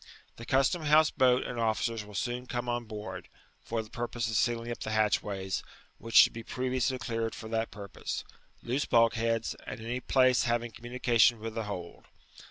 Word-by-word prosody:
The 115 - -9
custom 135 +5 +2
house 155 +1 +5
boat 130 -1 +3
and 120 - -4
officers 115 0 0
will 105 0 -12
soon 125 +3 -2
come 120 0 -3
on 120 0 -1
board, 105 -4 -7 0.3
for 115 -1 -3
the 110 - -15
purpose 120 -1 -3
of - - -2
sealing 120 +1 +1
up 120 - -5
the - - -4
hatchways, 100 -3 0 0.4
which 115 0 -7
should - - +8
be 115 - -6
previouslv 130 +1 -1
cleared 115 -1 -2
for 110 - -8
that 115 0 -1
purpose; 100 -2 -6 0.4
loose 130 +4 -1
bulk 115 -1 +4
heacb, 115 0 0 0.2
and - - -6
any 120 +3 -3
place 130 -1 +3
havinff 120 -1 -1
communication 120 0 +2
with 110 0 -5
the 115 -1 -3
hold. 90 -4 -7
115 Hz, 180 wpm, -30 LUFS, 110-125 Hz, 0.4 s, should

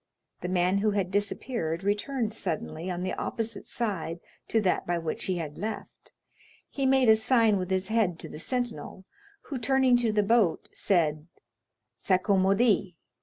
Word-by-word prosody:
The - - -3
man 180 +1 +2
who 215 +2 +2
had 195 -3 -1
disappeared 195 -3 -1
returned 215 +3 -1
suddenly 165 -3 -3
on 180 0 -3
the 185 - -2
opposite 225 -4 -4
side 180 -8 -2 0.3
to 225 - +2
that 190 -3 0
by 175 0 +1
which 165 +7 -3
he 185 - 0
had 155 -3 -6
left; 215 +3 -6 0.6
he 275 -1 0
made 265 -1 +4
a 220 - +8
sign 220 -1 +3
with 185 0 -4
his 190 0 -1
head 215 -7 +1
to - - -7
the - - -9
sentinel, 240 -3 -3 0.4
who, 275 -4 -5
turning 260 0 +3
to 235 -2 +1
the 210 -1 +2
boat, 215 -5 +2
said, 155 -5 +1 0.7
"S'accommodi." 195 +1 +2
200 Hz, 160 wpm, -28 LUFS, 180-230 Hz, 0.7 s, a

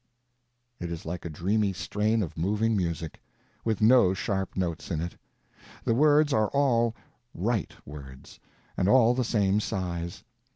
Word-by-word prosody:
It 85 -1 -4
is 85 - -6
like 90 +2 -5
a - - -3
dreamy 100 +6 0
strain 105 +5 0
of 80 -3 -6
moving 105 +6 +1
music, 85 -4 -3 0.4
with 110 -3 -1
no 110 -4 +5
sharp 95 0 -2
notes 85 -3 -2
in 85 -4 -1
it. 85 +2 -4 0.7
The - - +1
words 150 +2 +4
are 110 -1 +3
all 120 -4 +2 0.4
"right" 105 +2 -1
words, 70 -3 -11 0.4
and 95 - +1
all 120 0 +6
the 125 0 0
same 105 -3 +2
size. 85 -4 -4
100 Hz, 150 wpm, -27 LUFS, 85-115 Hz, 0.7 s, all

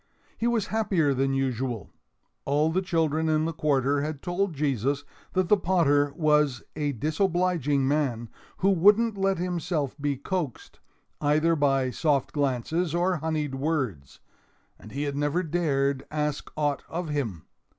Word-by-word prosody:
He 230 - -1
was 230 -4 +1
happier 185 -10 +2
than 135 +1 0
usual. 130 -4 -2 0.5
All 150 +3 +2
the 185 +3 +1
children 160 -3 0
in 155 0 +2
the 165 - -2
quarter 140 -2 +1
had 150 -1 -4
told 180 0 -1
Jesus 140 0 0 0.3
that 185 -1 +1
the 210 - +6
potter 145 -6 +2
was 150 -5 +2
a 145 -2 -1
disobliging 160 - +1
man, 135 -6 0 0.3
who 195 -1 +3
wouldn't 205 +5 +4
let 195 -1 +1
himself 170 -5 -2
be 145 -2 0
coaxed, 155 -2 -4 0.4
either 155 +3 +3
by 135 -3 +2
soft 145 -2 0
glances 145 +5 0
or 180 +1 +1
honeyed 155 -2 -2
words, 135 - -2 0.6
and 105 - -12
he 140 +2 -3
had 140 -1 -2
never 145 +5 0
dared 140 -5 0
ask 150 -1 -2
aught 145 -2 0
of 170 0 -4
him. 115 - -3
150 Hz, 145 wpm, -26 LUFS, 140-175 Hz, 0.6 s, the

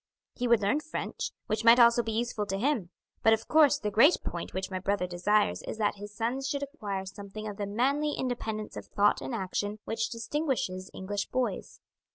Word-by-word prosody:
He 245 - -2
would 235 -3 +4
learn 280 +9 +2
French, 310 0 -4
which 215 +1 -1
might 230 +2 +8
also 235 0 +6
be 225 -1 -3
useful 225 -2 -1
to 195 0 -1
him; 230 -5 0 0.3
but 225 - +5
of 220 0 -1
course 305 -2 +5
the 210 -6 -3
great 270 - +6
point 170 0 -4
which 190 +1 -4
my 185 - -2
brother 195 0 0
desires 185 +4 +1
is - - -4
that 210 -2 0
his 205 +1 -8
sons 240 +6 -2
should 280 -1 -2
acquire 205 -10 -4
something 200 +2 -8
of 205 -1 -6
the 205 - -3
manly 280 +8 +1
independence 220 -4 -3
of - - -7
thought 205 0 +2
and 135 - -4
action 205 +2 -2
which 225 0 -1
distinguishes 230 -6 -2
English 200 +2 -3
boys. 255 -1 -3
215 Hz, 200 wpm, -29 LUFS, 200-245 Hz, 0.3 s, might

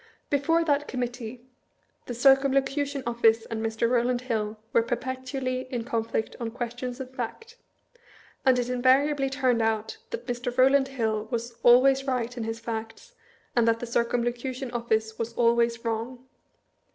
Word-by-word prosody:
Before 325 +4 +2
that 290 -2 +1
Committee, 245 -1 -5 0.6
the 245 - -4
Circum 270 +2 +5
locution 275 0 0
Office 230 -1 +3
and 225 -1 -4
Mr. 225 +1 0
Eowland 245 0 +1
Hill 220 -4 -2 0.2
were 230 - +5
perpetually 255 +2 -3
in 245 -3 -3
conflict 225 -1 -2
on 235 -2 -3
questions 245 +1 -5
of 260 -1 -7
fact; 455 - -6 0.9
and 260 -2 +4
it 245 -1 0
invariably 270 +3 +3
turned 260 -4 +1
out 220 - -1
that 470 - -5
Mr. 245 0 -3
Eowland 265 +2 +4
Hill 220 -5 -1
was 235 0 -3
always 265 +3 +6
right 250 -2 -1
in 235 -3 -4
his 225 0 -4
facts, 225 - -6 0.4
and 235 -1 +3
that 230 0 +3
the 245 - -4
Circumlocution 240 +2 -1
Office 220 -2 -1
was 230 0 -3
always 235 0 +2
wrong. 230 +3 -3
245 Hz, 150 wpm, -27 LUFS, 230-265 Hz, 0.9 s, always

